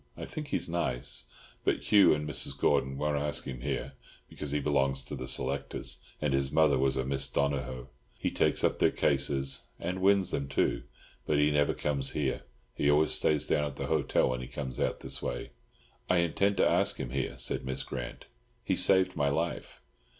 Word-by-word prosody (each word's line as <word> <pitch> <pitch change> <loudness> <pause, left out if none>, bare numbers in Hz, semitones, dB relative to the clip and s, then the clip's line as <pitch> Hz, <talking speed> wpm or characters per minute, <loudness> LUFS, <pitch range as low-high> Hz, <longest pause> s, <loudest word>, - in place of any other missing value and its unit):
I - - -5
think 150 -1 -6
he's - - -1
nice, 75 -8 -3 0.4
but - - -1
Hugh 100 -2 +7
and 75 0 0
Mrs. 75 - 0
Gordon 70 -2 +1
won't 75 0 0
ask 75 0 0
him 65 -3 -6
here 70 0 -3 0.4
because 75 - -5
he 75 +1 +1
belongs 70 -2 +1
to 70 - -6
the 65 -1 -6
selectors, 70 +1 -2 0.2
and 75 -3 0
his 70 0 +1
mother 75 -3 +4
was 65 0 +2
a 65 - 0
Miss 70 +1 0
Donohoe. 65 -3 -2 0.3
He - - -1
takes - - +1
up - - +2
their - - +5
cases—and 70 +6 -1
wins 95 -1 +4
them, 70 -1 -2
too. 70 - 0 0.4
But 75 - +2
he 75 +1 +4
never 75 0 +2
comes 70 -2 -1
here. 70 -3 -1 0.3
He 70 - +1
always 75 +2 +4
stays 75 -2 +2
down 75 - +1
at 70 -2 -4
the - - -4
hotel 80 -4 +2
when 65 0 -2
he 65 - -6
comes 65 -4 -6
out - - -1
this - - -2
way." - - -4 0.6
"I 90 - +4
intend 100 +4 +1
to - - +4
ask - - +2
him - - -4
here," 65 -1 -2
said - - -3
Miss 65 0 -3
Grant. 65 -2 -6 0.4
"He - - +1
saved 95 -1 +3
my 70 -1 +2
life." 80 +4 -3
70 Hz, 195 wpm, -30 LUFS, 65-75 Hz, 0.6 s, Hugh